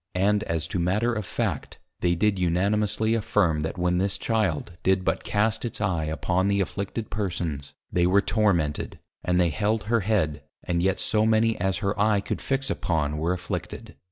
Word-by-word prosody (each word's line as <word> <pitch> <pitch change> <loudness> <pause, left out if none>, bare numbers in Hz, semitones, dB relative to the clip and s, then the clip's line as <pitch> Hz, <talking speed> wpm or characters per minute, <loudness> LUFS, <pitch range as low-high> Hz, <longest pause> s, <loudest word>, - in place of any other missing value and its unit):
And 100 +3 +2
as 80 -3 -1
to 90 - -2
matter 105 +8 +1
of 110 -4 -3
Fact, - - -3 0.2
they 85 -1 +2
did 100 +2 +1
unanimously 105 +5 +1
affirm, 100 -7 +2
that 80 +3 -3
when 90 0 +1
this 95 0 0
Child 100 -9 0
did 95 +2 +2
but 80 +3 0
cast 110 +2 0
its 120 - -4
Eye 90 -6 0
upon 90 +4 0
the 100 0 +2
afflicted 100 +3 -3
Persons, 85 -9 -3 0.2
they 90 0 +3
were 95 +2 +5
tormented; 100 -8 0 0.3
and 90 0 +1
they 90 -1 +4
held 105 +8 0
her 115 +3 +2
Head, 95 -8 0 0.2
and 85 -1 0
yet 95 +1 +1
so 105 0 +1
many 110 0 +3
as 95 +1 0
her 100 +1 0
Eye 105 -1 +4
could 100 - -4
fix 135 0 -1
upon 75 -3 -1
were 85 +3 0
afflicted. 90 -1 -5
95 Hz, 185 wpm, -26 LUFS, 85-105 Hz, 0.3 s, were